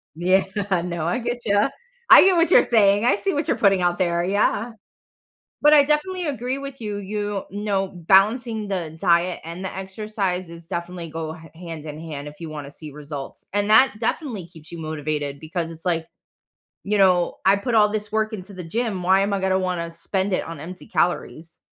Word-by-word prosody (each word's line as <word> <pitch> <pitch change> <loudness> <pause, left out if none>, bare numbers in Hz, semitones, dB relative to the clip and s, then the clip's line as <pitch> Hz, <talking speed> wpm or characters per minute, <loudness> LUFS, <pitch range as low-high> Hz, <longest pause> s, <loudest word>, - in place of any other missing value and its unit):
Yeah, 185 +3 +3 0.4
no, 170 -2 -3
I 175 - 0
get 240 0 -3
ya, 205 +4 +3 0.4
I - - +11
get 380 -2 +4
what 335 0 +3
you're - - +7
saying, 205 -2 +3
I 245 - +4
see 390 -4 -1
what 290 +1 -1
you're - - +2
putting 195 -3 +3
out 175 +1 +1
there, 170 -1 +1
yeah. 205 +4 +1 0.9
But 295 +1 +6
I 290 - +8
definitely 330 +5 0
agree 260 -1 -2
with 275 -1 -8
you, 210 -2 -3
you 205 0 -3
know, 200 -1 -1
balancing 210 +5 +2
the 170 -5 -3
diet 175 0 +2
and 170 +3 -7
the - - -5
exercise 190 -2 -3
is 165 0 -12
definitely 170 -1 -5
go 160 0 -5
ha 160 0 -13
hand 165 -2 -8
in 150 0 -7
hand 150 -3 -7
if 150 - -10
you 165 -2 -7
wanna 145 -2 -7
see 155 +1 -10
results, 145 -1 -8
and 205 0 0
that 225 +4 +6
definitely 225 - -3
keeps 160 -2 -15
you 170 - -7
motivated 150 -2 -3
because 165 +2 -4
it's 165 +3 -12
like, 165 -2 0 0.8
you 205 +1 0
know, 180 -3 +3
"I 195 +1 +5
put 235 +4 -2
all 210 -1 +6
this 210 0 -3
work 220 0 0
into 200 -1 -7
the 180 - -7
gym, 210 +1 -2
why 190 +2 +4
am 200 +1 0
I 195 - 0
gonna 190 0 +1
wanna 180 -3 -2
spend 190 +4 -2
it - - 0
on 165 -3 -8
empty 180 +4 -9
calories?" 165 -1 -2
190 Hz, 200 wpm, -23 LUFS, 165-210 Hz, 0.9 s, I